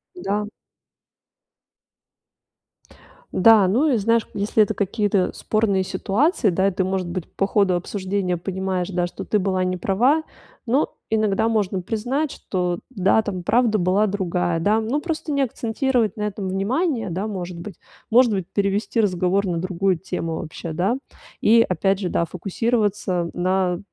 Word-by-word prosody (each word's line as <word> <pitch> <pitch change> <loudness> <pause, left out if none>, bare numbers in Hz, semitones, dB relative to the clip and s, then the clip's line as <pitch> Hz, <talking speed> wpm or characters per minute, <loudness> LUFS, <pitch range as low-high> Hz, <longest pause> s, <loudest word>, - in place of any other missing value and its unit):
Да. 210 - -2 2.8
Да, 210 0 +6
ну 255 +12 +2
и 245 - +3
знаешь, 230 +2 +1
если 210 +2 +2
это 215 +1 -1
какие-то 200 -1 0
спорные 205 -3 0
ситуации, 210 - +1
да, 190 +2 +2
и 195 - +1
ты, 185 +1 -1
может 185 -1 -1
быть, 175 0 -5
по 195 - +1
ходу 200 -4 +2
обсуждения 185 0 -2
понимаешь, 190 0 -3
да, 175 -2 0
что - - -8
ты 210 - +1
была 185 -1 0
неправа, 195 - +1 0.4
но 265 +6 +1 0.2
иногда 220 0 +1
можно 200 -4 0
признать, 245 - -2
что, 180 -2 -2
да, 195 -1 +3
там 185 -4 -4
правда 225 +2 +3
была 185 +4 +2
другая, 180 -3 -1
да, 210 +6 +2
ну, 235 +7 -1
просто 320 -2 -3
не 280 - +1
акцентировать 235 -2 0
на 210 - -5
этом 205 -2 -3
внимание, 225 - -1
да, 190 +5 -3
может 180 -4 -5
быть. 200 +1 -8 0.4
Может 245 0 +6
быть, 190 -4 -1
перевести 200 +2 0
разговор 190 0 +1
на 170 -2 -1
другую 185 +1 0
тему 165 -2 -4
вообще, 165 0 -6
да. 190 +10 0 0.4
И 230 +1 +5
опять 195 +2 +1
же, 180 -3 -2
да, 170 - 0
фокусироваться 200 -1 -1
на 180 0 0
195 Hz, 150 wpm, -22 LUFS, 185-220 Hz, 2.8 s, Да